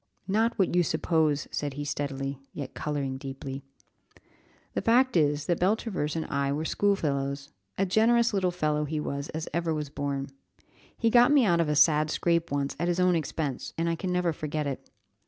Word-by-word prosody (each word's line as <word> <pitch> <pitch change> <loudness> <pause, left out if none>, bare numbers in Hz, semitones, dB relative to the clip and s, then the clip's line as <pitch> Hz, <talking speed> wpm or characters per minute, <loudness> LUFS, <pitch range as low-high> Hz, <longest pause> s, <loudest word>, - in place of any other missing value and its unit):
"Not 225 +4 +1
what 190 -4 +2
you 180 - +5
suppose," 160 -3 +1
said 145 -2 -3
he 145 0 -4
steadily, 140 -1 -3
yet 140 -3 -6
colouring 140 -3 -3
deeply. 135 0 -6 1.1
"The - - -1
fact 250 +1 +3
is, 150 -2 +2
that 175 -2 0
Beltravers 185 -5 0
and 160 - -2
I 140 -1 -1
were 150 +3 -2
school 200 +4 +2
fellows; 140 -3 -2 0.3
a 195 - +2
generous 230 +4 +3
little 190 -2 +2
fellow 150 -3 0
he 155 +1 -2
was 140 -1 -4
as 160 0 -5
ever 165 -1 0
was 150 -2 -4
born; 140 -1 -3 0.7
he 230 - +2
got 245 +3 +6
me 280 -5 +5
out 170 -4 +3
of 160 - 0
a 150 - +1
sad 155 0 +4
scrape 170 +1 +1
once 140 0 -2
at 170 - 0
his 175 0 0
own 180 -1 +4
expense, 150 -4 -3
and 165 +1 0
I 170 - +1
can 180 +2 -3
never 180 -2 +1
forget 150 0 -3
it. 140 -2 -5
155 Hz, 190 wpm, -28 LUFS, 145-180 Hz, 1.1 s, got